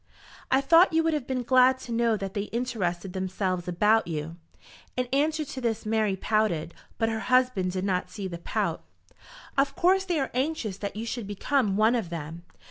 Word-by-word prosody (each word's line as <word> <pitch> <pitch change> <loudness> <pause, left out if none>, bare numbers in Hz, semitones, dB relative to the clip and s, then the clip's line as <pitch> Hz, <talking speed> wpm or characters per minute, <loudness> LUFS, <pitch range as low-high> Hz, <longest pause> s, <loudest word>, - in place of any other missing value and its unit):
"I 265 +1 +4
thought 330 +6 +5
you 325 0 +3
would 325 0 +1
have 295 -5 -2
been 255 -2 -2
glad 255 +1 +5
to 240 - -8
know 230 -1 +2
that 195 -1 -5
they 200 0 -2
interested 195 -7 -3
themselves 185 -1 -2
about 210 +5 +3
you." 160 0 -4 0.6
In 250 - +1
answer 305 +2 +1
to 265 -2 -7
this 230 -3 -1
Mary 215 -2 +1
pouted, 190 -6 0 0.2
but 225 - +1
her 220 -1 -2
husband 250 -8 +2
did 185 0 -2
not 180 -2 -1
see 195 +1 -5
the 170 -2 -7
pout. - - -2 0.8
"Of 275 0 +1
course 380 +2 +3
they 350 -4 0
are 270 - -2
anxious 255 - -2
that 200 -1 -4
you 220 +2 -4
should 230 -2 -4
become 205 0 0
one 220 +2 +4
of 225 -8 -1
them. 165 0 -6
220 Hz, 195 wpm, -27 LUFS, 190-260 Hz, 0.8 s, thought